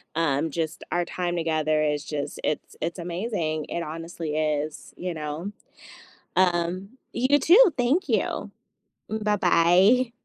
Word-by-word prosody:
um, 160 -1 +1
just 160 0 -3
our 175 0 +1
time 175 0 -3
together 155 -2 +1
is 150 -1 0
just 145 0 -5
it's 150 - -3
it's 170 +3 -3
amazing, 170 -3 -2
it 170 - -2
honestly 165 0 -5
is, 155 -1 -2
you 180 -1 -3
know? 155 +6 -5 0.8
Um, 180 +2 +1 0.2
you 270 +4 +3
too. 375 - +7
Thank 260 +10 +1
you. - - -1 0.6
M 220 0 -2
Bye-bye. 205 +4 +4
170 Hz, 130 wpm, -25 LUFS, 155-195 Hz, 0.8 s, too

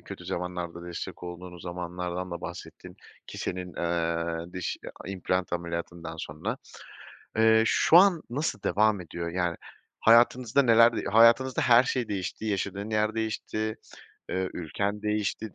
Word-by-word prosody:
kötü - - -10
zamanlarda 85 -1 -4
destek 85 0 -6
olduğunuz 90 0 -8
zamanlardan 90 +1 -4
da 85 0 -5
bahsettin - - -9 0.3
ki - - -9
senin, 90 -1 -4
eee, 85 0 -2
diş 90 -1 -3
i - - -31 0.2
a - - -7
implant 90 -1 -2
ameliyatından 85 -1 -4
sonra. 75 -1 -4 0.8
Eee, 110 0 +5
şu 165 - +4
an 180 -3 +6
nasıl 145 +6 -2
devam 105 -1 +2
ediyor? 85 0 -5
Yani, 85 -1 -1 0.4
hayatınızda 120 +3 +5
neler 115 -1 +6
de - - -2
hayatınızda 115 +4 +5
her 120 0 +6
şey 125 -3 -1
değişti, 95 +1 -4
yaşadığın 100 0 -2
yer 110 0 +1
değişti, 110 -1 -2 0.5
eee, 95 0 -2
ülken 100 +5 -3
değişti, 105 -1 -2
95 Hz, 140 wpm, -27 LUFS, 85-110 Hz, 0.8 s, an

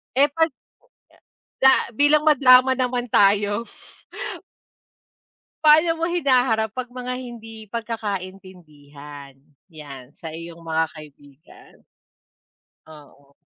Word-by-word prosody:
Eh, 280 +2 +5
'pag 325 0 +2 1.1
Da 265 -2 +4
bilang 290 +4 +3
madrama 260 -3 +6
naman 245 -1 -1
tayo. 205 +2 +2 2.0
Paano 315 +2 +5
mo 330 +1 -3
hinaharap 250 - +1
'pag 255 -1 -5
mga 250 0 -6
hindi 225 -3 -11
pagkakaintindihan, 180 - -8 0.3
yan, 140 -5 -11
sa 160 -2 -9
iyong 170 +1 -9
mga 160 -1 -1
kaibigan? 145 -2 -17 1.0
Oo. 145 -2 -18
215 Hz, 90 wpm, -22 LUFS, 160-255 Hz, 2.0 s, madrama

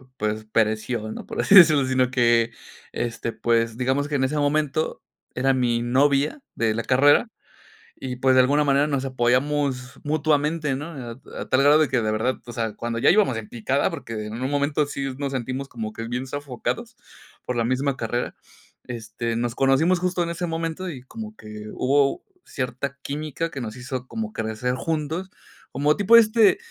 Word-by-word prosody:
pues, 110 -1 -2
pereció, 110 +1 0
¿no?, - - -7
por - - -3
así - - +2
decirlo, 155 -7 +8
sino 130 -1 +1
que, 120 -2 +3 0.4
este, 115 -1 -3
pues, 115 -1 +1
digamos 130 +3 0
que 145 - -3
en 130 - +1
ese 150 +3 0
momento 150 +1 0 0.3
era 135 +2 +2
mi 120 -2 +1
novia 140 - +2 0.2
de 110 -2 +1
la 115 - -2
carrera, 145 - +4 0.7
y, 130 -1 -5
pues, 130 0 +3
de 130 - +7
alguna 145 +4 +3
manera 140 +1 +3
nos 140 -3 -1
apoyamos 130 0 0
mutuamente, 150 -1 +1
¿no?, 145 +3 -5
a 125 -6 -7 0.3
a - - -7
tal 130 +1 +3
grado 145 +2 +6
de 155 - +3
que 130 -3 +1
de 110 -1 0
verdad, 115 +4 0
o 120 - -8
sea, 115 -2 -3
cuando 115 0 -4
ya 135 - +4
íbamos 195 - +3
en 110 -2 -7
picada, 130 +4 0
porque 115 - -6
en 110 +3 -6
un 130 - -1
momento 145 +1 +1
sí 140 -1 -4
s 130 - -5
nos 140 -1 -3
sentimos 130 +2 -3
como 110 -4 -6
que 115 +1 -6
bien 125 +2 -3
sofocados 145 - -4 0.5
por 125 - -2
la 115 - +1
misma 135 +2 0
carrera, 120 +2 -3 0.5
este, 115 0 -4
nos 120 0 -2
conocimos 150 +7 +3
justo 180 0 -1
en 170 - -3
ese 170 +1 -3
momento 165 +2 -3
y 130 -7 -8
como 215 +9 -9
que 105 0 -9
hubo 140 +1 +1 0.2
cierta 135 +1 -4
química 155 +3 -3
que 135 -5 -6
nos 110 -1 -6
hizo 125 0 -5
como 220 - -5
crecer 110 +3 -2
juntos, 160 +5 -3 0.4
como 145 +3 +2
tipo 210 +3 +6
este 220 -1 +5
135 Hz, 185 wpm, -24 LUFS, 120-150 Hz, 0.7 s, decirlo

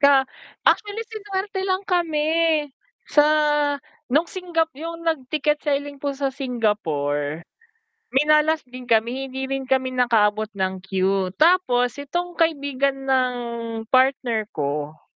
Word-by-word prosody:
Ka 280 -2 +6 0.4
actually 420 +1 +2
sinuwerte 405 -2 -4
lang 375 0 0
kami, 325 -5 0 0.8
sa 295 0 +5 0.8
nung 300 +6 +1
Singap 340 -3 -1
yung 335 +1 -6
nag 320 -6 -1
ticket 300 +1 +1
selling 285 -1 -2
po 280 0 -2
sa 275 0 -1
Singapore, 165 - -1 0.7
minalas 305 +3 +4
din 250 0 -9
kami 235 +3 +1
hindi 265 0 -5
rin 270 0 -2
kami 260 0 +1
nakaabot 220 -4 +2
ng 190 -1 -3
qeue, 190 -1 0
tapos 285 - +3
itong 345 +5 -4
kaibigan 280 -4 0
ng 260 -1 +4 0.7
partner 255 -4 +2
ko 150 +1 -3
270 Hz, 120 wpm, -23 LUFS, 230-315 Hz, 0.8 s, Ka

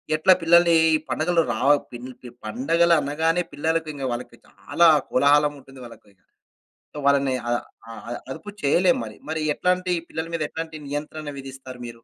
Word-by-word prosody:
ఎట్లా 170 +4 +5
పిల్లల్ని 170 0 +5 0.2
ఈ - - +3
పండగలు 165 +6 +1
రావ 125 +5 +1 0.2
పిన్ 120 +1 -8
ప 125 -2 -11
పండగలు 165 +10 +2
అనగానే 160 +5 0
పిల్లలకింక 155 -1 -2
వాళ్ళకి 120 0 -6
చాలా 170 0 +1 0.2
కోలాహలముంటుంది 140 -1 +1
వాళ్ళకి. 115 -3 -14 0.8
సో, 150 - -8
వాళ్ళని 140 -2 +3
అ - - 0 0.4
అ - - -10 0.4
అదుపు 205 - -7
చేయలేం 175 +5 +3
మరి 110 -1 -10
మరి 160 0 -2
ఎట్లాంటి 180 0 0 0.2
పిల్లల 160 0 -4
మీద 160 - -1
ఎట్లాంటి 160 -1 -6
నియంత్రణ 150 +1 -5
విధిస్తారు 130 -1 -10
మీరు? - - -6
150 Hz, 145 wpm, -23 LUFS, 135-165 Hz, 0.8 s, ఎట్లా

